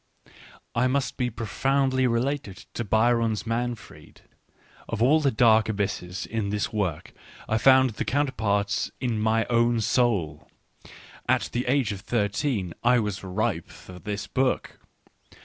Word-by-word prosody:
I 125 +2 +2
must 135 +1 -1
be 125 -2 -1
profoundly 130 +4 0
related 115 -4 -2
to 120 - -3
Byron's 115 0 +1
Manfred: 120 0 -5 0.7
of 115 - -3
all 135 +7 +5
the 145 -3 +2
dark 110 -2 +4
abysses 95 -3 -3
in 110 -3 -3
this 105 +3 -2
work 95 -8 -2 0.3
I 110 - +1
found 130 0 +5
the 105 - -3
counterparts 110 -8 0
in 120 -4 -1
my 110 +1 +2
own 120 0 +2
soul 105 - 0 0.4
— - - -15 0.3
at - - +2
the 125 +1 -2
age 130 -4 +2
of 100 -2 -6
thirteen 105 - -1
I 125 +1 +5
was 105 -4 -2
ripe 95 -3 -2
for 90 -1 -12
this 100 +1 -4
book. 130 0 -1
115 Hz, 140 wpm, -26 LUFS, 105-125 Hz, 0.7 s, all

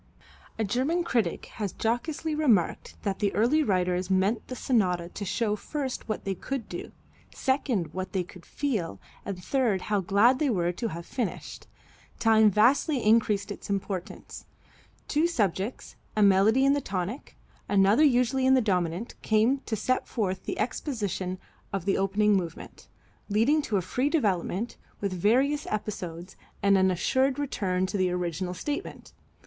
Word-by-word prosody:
A 220 - 0
German 265 - 0
critic 230 - 0 0.2
has 200 -3 -1
jocosely 290 +7 -1
remarked 250 - +1
that 200 -2 -2
the 200 -1 +1
early 245 +9 +3
writers 180 -6 0
meant 190 +4 +1
the 255 - -5
sonata 180 -10 +1
to 205 - -7
show 210 +2 0
first 265 +2 -5
what 215 - -2
they 195 - 0
could 255 +5 -5
do, - - -7 0.4
second 260 - 0
what 185 0 -4
they 190 -2 0
could 180 0 -14
feel, 205 - -3 0.3
and 185 -3 -5
third 230 -4 +1
how 205 - +3
glad 205 +7 +4
they 300 -3 +2
were 175 -6 +1
to 205 +6 -3
have 170 -4 -6
finished. 235 -2 -5 0.5
Time 220 -1 +5
vastly 250 - +3
increased 215 -2 +3
its 205 - -8
importance. 195 -2 -4 0.6
Two 310 +3 +2
subjects, 210 - -2 0.2
a 215 - +3
melody 205 +7 +5
in 275 - +5
the 285 - 0
tonic, 195 +4 -4 0.3
another 200 +7 +4
usually 260 -1 +3
in 265 - +6
the - - +5
dominant, 185 -2 -1
came 225 +5 +2
to 220 - -1
set 255 +5 -1
forth 190 -5 -2
the 365 - -3
exposition 205 - -2 0.3
of 195 -3 -3
the 195 - +2
opening 205 +2 +3
movement, 170 -4 -5 0.4
leading 230 +10 +3
to 220 -8 -1
a 185 - -1
free 250 +10 0
development, 210 - -1 0.2
with 200 -2 -2
various 260 - +2
episodes, 185 -4 -5 0.3
and 200 0 +5
an 190 0 +4
assured 260 +9 +1
return 190 -10 -1
to 190 - -3
the 185 -1 +2
original 180 0 -2
statement. 295 - -5
210 Hz, 155 wpm, -27 LUFS, 185-255 Hz, 0.6 s, in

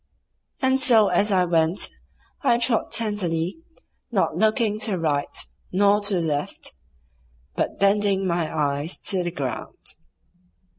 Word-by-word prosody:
And 260 0 +3
so 225 -6 +5
as 200 +4 +2
I 185 -2 +3
went 165 +1 +1 0.5
I 265 -6 +3
trod 235 -1 +1
tenderly, 190 - -1 0.5
not - - +1
looking 215 -1 +2
to 220 - -1
the 185 - -1
right 145 -3 0 0.4
nor 200 +2 +3
to 200 -1 +1
the 175 - +1
left, 145 -2 -2 0.8
but - - -2
bending 200 -1 +2
my 170 -3 -1
eyes 145 +2 -1
to 190 -2 +1
the 175 - -1
ground. 140 -6 -5
195 Hz, 135 wpm, -24 LUFS, 165-215 Hz, 0.8 s, so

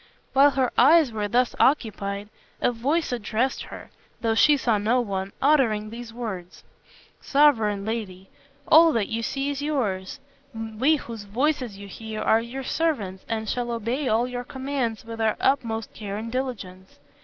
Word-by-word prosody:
While 275 +2 +7
her 265 -3 0
eyes 315 -5 +6
were 210 -2 -2
thus 245 +4 +1
occupied, 205 -6 +1 0.3
a - - +2
voice 280 +8 -1
addressed 240 +2 -1
her, - - -11 0.3
though 225 -1 +1
she 295 +6 +5
saw 230 -5 +1
no 225 +5 +2
one, 195 -4 -3
uttering 230 -8 +3
these 235 0 -8
words: 210 -7 -7 0.6
"Sovereign 225 -9 +3
lady, 200 -4 -4 0.4
all 325 +1 +7
that 220 -4 0
you 230 0 -2
see 275 +4 -2
is 285 0 -4
yours. 215 -11 -2 0.4
We 225 +7 +1
whose 230 -7 -7
voices 250 0 -1
you 200 0 -9
hear 220 +2 -7
are 225 - +3
your 250 +4 -6
servants 225 - -1
and 220 -1 -2
shall 245 +1 -2
obey 235 +4 -2
all 230 +2 +2
your 245 0 -5
commands 260 -4 -3
with 225 0 -6
our 220 -1 +1
utmost 230 -5 0
care 205 -2 -6
and 225 +2 -5
diligence. 205 -8 -5
230 Hz, 160 wpm, -25 LUFS, 215-265 Hz, 0.6 s, While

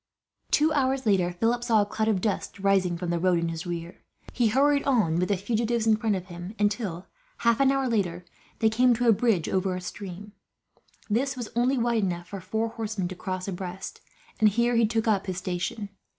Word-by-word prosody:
Two 310 +1 +3
hours 265 -2 +1
later, 190 -4 +2
Philip 230 +7 0
saw 225 -4 +3
a - - -4
cloud 215 +1 -2
of 205 -4 +1
dust 205 -1 -2
rising 190 -3 +2
from 175 0 -3
the 170 - 0
road 180 0 +3
in 170 0 -1
his 165 +1 -5
rear. 170 0 -6 0.3
He 240 -2 +2
hurried 280 +5 +3
on 220 - +2
with 180 - 0
the 200 - +2
fugitives 225 +3 0
in 220 -1 +5
front 215 -1 0
of 185 -1 -5
him 175 +3 -8
until, 205 -4 -1 0.4
half 235 -1 +4
an 275 -1 +5
hour 270 -1 +1
later, 180 -7 -1 0.4
they 220 - +5
came 245 +2 +4
to 245 +1 0
a 230 - +7
bridge 210 -6 +1
over 185 -1 0
a - - -3
stream. 195 +2 -8 0.7
This 260 +5 0
was 240 -3 -5
only 250 +3 +2
wide 235 -2 +1
enough 175 -3 -3
for 200 -2 -6
four 220 +5 -2
horsemen 215 -5 -3
to 185 - -6
cross 185 -1 -4
abreast, 185 0 -6 0.4
and 215 -1 +6
here 235 +3 +1
he 230 -1 +4
took 225 +1 -1
up 205 -2 +1
his 185 -2 -3
station. 185 +3 -3
210 Hz, 210 wpm, -26 LUFS, 180-235 Hz, 0.7 s, a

